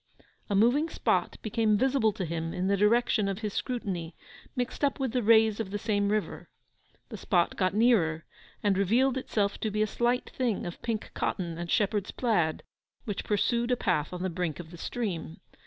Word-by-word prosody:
A 200 Hz, -, +1 dB
moving 245 Hz, +10 st, +3 dB
spot -, -, 0 dB
became 215 Hz, -1 st, +2 dB
visible 255 Hz, -2 st, +2 dB
to 185 Hz, -, -3 dB
him 165 Hz, 0 st, -3 dB
in 180 Hz, -, -1 dB
the 200 Hz, +1 st, +3 dB
direction 210 Hz, +1 st, +3 dB
of 195 Hz, -1 st, -2 dB
his 210 Hz, -2 st, -3 dB
scrutiny, 185 Hz, -10 st, -3 dB, 0.4 s
mixed 250 Hz, +3 st, -3 dB
up 285 Hz, 0 st, +1 dB
with 265 Hz, -3 st, -1 dB
the 250 Hz, -, 0 dB
rays 220 Hz, -1 st, +5 dB
of 220 Hz, -4 st, -3 dB
the 205 Hz, -, -3 dB
same 205 Hz, -1 st, 0 dB
river. 210 Hz, 0 st, -2 dB, 0.6 s
The -, -, -7 dB
spot 175 Hz, -4 st, +1 dB
got 185 Hz, 0 st, 0 dB
nearer, 190 Hz, -9 st, +3 dB, 0.4 s
and 200 Hz, -2 st, +2 dB
revealed 240 Hz, +7 st, +3 dB
itself 210 Hz, -6 st, -1 dB
to 220 Hz, -, -1 dB
be 210 Hz, +1 st, +1 dB
a -, -, +2 dB
slight 240 Hz, +3 st, 0 dB
thing 240 Hz, -5 st, -1 dB
of 175 Hz, -, -7 dB
pink 225 Hz, -2 st, -3 dB
cotton 170 Hz, -4 st, -2 dB
and 175 Hz, 0 st, -5 dB
shepherd's 205 Hz, 0 st, +1 dB
plaid, 175 Hz, -11 st, 0 dB, 0.4 s
which 205 Hz, -3 st, -3 dB
pursued 235 Hz, +3 st, +1 dB
a 250 Hz, -, +2 dB
path 150 Hz, -8 st, 0 dB
on 180 Hz, 0 st, -5 dB
the 185 Hz, -, -1 dB
brink 175 Hz, -3 st, -3 dB
of 165 Hz, -2 st, -9 dB
the 175 Hz, -, -10 dB
stream. 185 Hz, -9 st, -4 dB
210 Hz, 190 wpm, -29 LUFS, 185-235 Hz, 0.6 s, rays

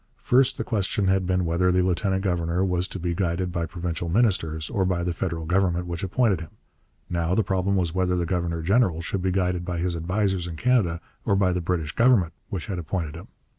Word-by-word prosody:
First 130 Hz, +1 st, +3 dB
the -, -, -2 dB
question 100 Hz, -2 st, 0 dB
had 95 Hz, -1 st, +2 dB
been 90 Hz, -1 st, +1 dB
whether 85 Hz, +2 st, +2 dB
the 90 Hz, 0 st, +3 dB
lieutenant 95 Hz, +1 st, 0 dB
governor 90 Hz, -1 st, 0 dB
was 90 Hz, -1 st, 0 dB
to -, -, -6 dB
be 85 Hz, -1 st, -2 dB
guided 90 Hz, 0 st, -1 dB
by 85 Hz, -2 st, -2 dB
provincial 85 Hz, 0 st, -4 dB
ministers 80 Hz, -7 st, +1 dB
or 95 Hz, -, 0 dB
by 90 Hz, -2 st, 0 dB
the 90 Hz, 0 st, -1 dB
federal 85 Hz, -2 st, -3 dB
government 90 Hz, 0 st, +1 dB
which 85 Hz, -1 st, -4 dB
appointed 95 Hz, -2 st, +1 dB
him. 80 Hz, -, -8 dB, 0.6 s
Now 85 Hz, 0 st, 0 dB
the 110 Hz, -, +3 dB
problem 95 Hz, 0 st, 0 dB
was 90 Hz, -4 st, 0 dB
whether 90 Hz, -1 st, +1 dB
the 85 Hz, -1 st, 0 dB
governor 85 Hz, -2 st, -2 dB
general 95 Hz, -3 st, +2 dB
should 95 Hz, +2 st, -2 dB
be 95 Hz, -, +1 dB
guided 90 Hz, -1 st, 0 dB
by 90 Hz, -1 st, -3 dB
his 85 Hz, 0 st, -1 dB
advisers 90 Hz, +1 st, -1 dB
in 85 Hz, -, -6 dB
Canada, 100 Hz, -6 st, +1 dB, 0.2 s
or 100 Hz, -, +2 dB
by 95 Hz, -2 st, +2 dB
the 90 Hz, -, -1 dB
British 85 Hz, -3 st, -1 dB
Government 115 Hz, -6 st, +3 dB, 0.2 s
which 95 Hz, -5 st, -4 dB
had 95 Hz, -4 st, -4 dB
appointed 85 Hz, -2 st, -3 dB
him. 85 Hz, +2 st, -10 dB
90 Hz, 215 wpm, -25 LUFS, 85-95 Hz, 0.6 s, First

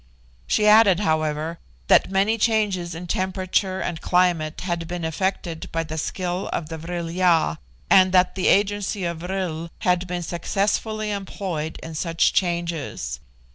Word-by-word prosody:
She 210 Hz, -, +2 dB
added, 210 Hz, -3 st, +6 dB
however, 155 Hz, -2 st, -1 dB, 0.3 s
that -, -, +4 dB
many 200 Hz, +4 st, +1 dB
changes 205 Hz, -6 st, +1 dB
in 175 Hz, +2 st, -6 dB
temperature 185 Hz, +1 st, -1 dB
and 170 Hz, -2 st, -3 dB
climate 175 Hz, -4 st, +1 dB
had 170 Hz, -2 st, -3 dB
been 175 Hz, -1 st, -4 dB
effected 170 Hz, 0 st, -2 dB
by 165 Hz, 0 st, -1 dB
the 160 Hz, 0 st, -5 dB
skill 180 Hz, +3 st, -3 dB
of 160 Hz, -2 st, -3 dB
the 160 Hz, -1 st, -6 dB
Vril 170 Hz, 0 st, -4 dB
ya, 170 Hz, -2 st, +2 dB, 0.3 s
and 185 Hz, -1 st, +6 dB
that 180 Hz, 0 st, +4 dB
the 185 Hz, -, -1 dB
agency 205 Hz, 0 st, +1 dB
of 170 Hz, -1 st, -3 dB
vril 175 Hz, -2 st, -3 dB
had 180 Hz, 0 st, +1 dB
been 175 Hz, -1 st, -3 dB
successfully 210 Hz, +5 st, -1 dB
employed 185 Hz, -5 st, -4 dB
in 165 Hz, -, -7 dB
such 165 Hz, +1 st, +1 dB
changes. 170 Hz, -, -2 dB
180 Hz, 145 wpm, -23 LUFS, 165-190 Hz, 0.3 s, added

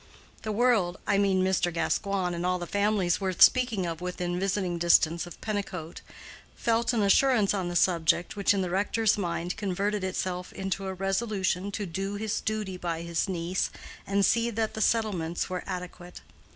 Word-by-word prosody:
The 215 Hz, -, -3 dB
world—I 205 Hz, -4 st, +1 dB
mean 190 Hz, -2 st, +2 dB
Mr. 185 Hz, -2 st, +1 dB
Gascoigne 185 Hz, +2 st, -1 dB
and 170 Hz, -, -4 dB
all 180 Hz, 0 st, +1 dB
the 175 Hz, -, -5 dB
families 200 Hz, -2 st, +1 dB
worth 185 Hz, -2 st, -2 dB
speaking 245 Hz, -7 st, +5 dB
of 165 Hz, 0 st, -4 dB
within 180 Hz, 0 st, -3 dB
visiting 190 Hz, -2 st, -1 dB
distance 170 Hz, 0 st, +3 dB
of 175 Hz, -, -11 dB
Pennicote—felt 205 Hz, +4 st, -3 dB
an 220 Hz, -3 st, +2 dB
assurance 215 Hz, 0 st, +4 dB
on 190 Hz, -3 st, -2 dB
the 175 Hz, -, -5 dB
subject 170 Hz, -1 st, +2 dB
which 200 Hz, -1 st, +2 dB
in 195 Hz, -2 st, +1 dB
the 180 Hz, -, -3 dB
rector's 205 Hz, +3 st, +2 dB
mind 175 Hz, -2 st, -3 dB
converted 200 Hz, +1 st, -1 dB
itself 185 Hz, -1 st, -3 dB
into 195 Hz, 0 st, -3 dB
a 190 Hz, -, -3 dB
resolution 195 Hz, -1 st, -1 dB
to 205 Hz, -, -3 dB
do 195 Hz, +3 st, -4 dB
his 215 Hz, +1 st, -2 dB
duty 210 Hz, -4 st, -3 dB
by 170 Hz, -2 st, -3 dB
his 170 Hz, +3 st, -1 dB
niece 180 Hz, 0 st, -1 dB, 0.4 s
and 200 Hz, 0 st, +2 dB
see 235 Hz, +3 st, +2 dB
that 220 Hz, -1 st, -2 dB
the 220 Hz, -, -4 dB
settlements 190 Hz, -7 st, 0 dB
were 180 Hz, -, -2 dB
adequate. 180 Hz, -1 st, -7 dB
190 Hz, 165 wpm, -28 LUFS, 175-205 Hz, 0.4 s, speaking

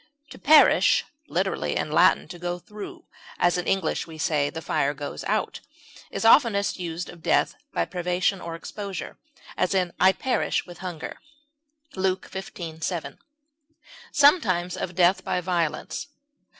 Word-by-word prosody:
To -, -, -11 dB
perish 305 Hz, +1 st, +6 dB, 0.2 s
(literally, -, -, -1 dB
in -, -, -2 dB
Latin, -, -, +4 dB
to 175 Hz, -, -9 dB
go 175 Hz, 0 st, -3 dB
through, 210 Hz, -, -10 dB, 0.3 s
as 175 Hz, -1 st, +3 dB
in 180 Hz, -, -2 dB
English 195 Hz, -2 st, 0 dB
we 160 Hz, -1 st, -10 dB
say, 150 Hz, -2 st, +1 dB
"the 160 Hz, -, -6 dB
fire 145 Hz, -2 st, 0 dB
goes 145 Hz, +1 st, -6 dB
out") -, -, -1 dB, 0.5 s
is -, -, -4 dB
oftenest 225 Hz, -6 st, +4 dB
used 170 Hz, 0 st, -4 dB
of 170 Hz, -, -12 dB
death -, -, +2 dB, 0.2 s
by 85 Hz, -, 0 dB
privation 180 Hz, -, -1 dB
or 165 Hz, -1 st, -5 dB
exposure; 200 Hz, +3 st, -7 dB, 0.4 s
as, 185 Hz, -, 0 dB, 0.2 s
"I 190 Hz, -, +6 dB
perish 255 Hz, +6 st, -1 dB
with 175 Hz, -1 st, -12 dB
hunger," 175 Hz, -4 st, -6 dB, 0.8 s
Luke 190 Hz, 0 st, -1 dB
xv, 170 Hz, -4 st, -7 dB
17; 175 Hz, -4 st, -3 dB, 0.9 s
sometimes, 190 Hz, -, +3 dB
of 180 Hz, -1 st, -5 dB
death 180 Hz, +2 st, +3 dB
by -, -, -1 dB
violence. 175 Hz, -, -2 dB
180 Hz, 140 wpm, -25 LUFS, 170-195 Hz, 0.9 s, perish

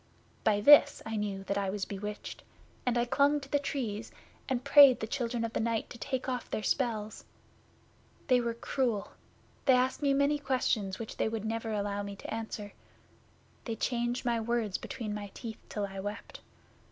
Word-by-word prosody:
By 205 Hz, -2 st, +3 dB
this 285 Hz, +3 st, +7 dB
I 225 Hz, -, -3 dB
knew 205 Hz, -2 st, -2 dB
that 200 Hz, +1 st, -1 dB
I 195 Hz, -1 st, -1 dB
was 195 Hz, 0 st, -2 dB
bewitched, 210 Hz, +1 st, -6 dB, 0.5 s
and 245 Hz, -1 st, +2 dB
I 240 Hz, -, +2 dB
clung 280 Hz, +4 st, +3 dB
to 275 Hz, -, -11 dB
the 285 Hz, +1 st, +1 dB
Trees, 230 Hz, -6 st, -3 dB, 0.4 s
and 255 Hz, -1 st, -1 dB
prayed 280 Hz, -4 st, +8 dB
the -, -, -2 dB
Children 235 Hz, -1 st, -2 dB
of 225 Hz, -, -5 dB
the -, -, 0 dB
Night 230 Hz, -1 st, -1 dB
to 235 Hz, -, -9 dB
take 260 Hz, +3 st, -3 dB
off 250 Hz, -2 st, -3 dB
their 215 Hz, -, -3 dB
spells. 220 Hz, -5 st, -1 dB, 1.0 s
They 250 Hz, -2 st, +4 dB
were 235 Hz, -1 st, -2 dB
cruel. 235 Hz, -3 st, -1 dB, 0.5 s
They 265 Hz, -, +6 dB
asked 255 Hz, +3 st, +1 dB
me 280 Hz, -1 st, +3 dB
many 285 Hz, +1 st, +2 dB
questions 235 Hz, -8 st, 0 dB
which 225 Hz, -, -7 dB
they -, -, +1 dB
would 220 Hz, -1 st, -4 dB
never 225 Hz, 0 st, -2 dB
allow 205 Hz, -1 st, -1 dB
me 200 Hz, 0 st, -6 dB
to 195 Hz, -, -7 dB
answer. 220 Hz, -2 st, -5 dB, 0.9 s
They 230 Hz, -, -3 dB
changed 240 Hz, +2 st, -1 dB
my 235 Hz, -1 st, +1 dB
words 225 Hz, -3 st, -1 dB
between 215 Hz, -4 st, -5 dB
my 205 Hz, -1 st, -5 dB
teeth 225 Hz, -3 st, -7 dB
till 205 Hz, -1 st, -2 dB
I 195 Hz, -1 st, -7 dB
wept. 205 Hz, +2 st, -6 dB
230 Hz, 185 wpm, -31 LUFS, 210-255 Hz, 1.0 s, prayed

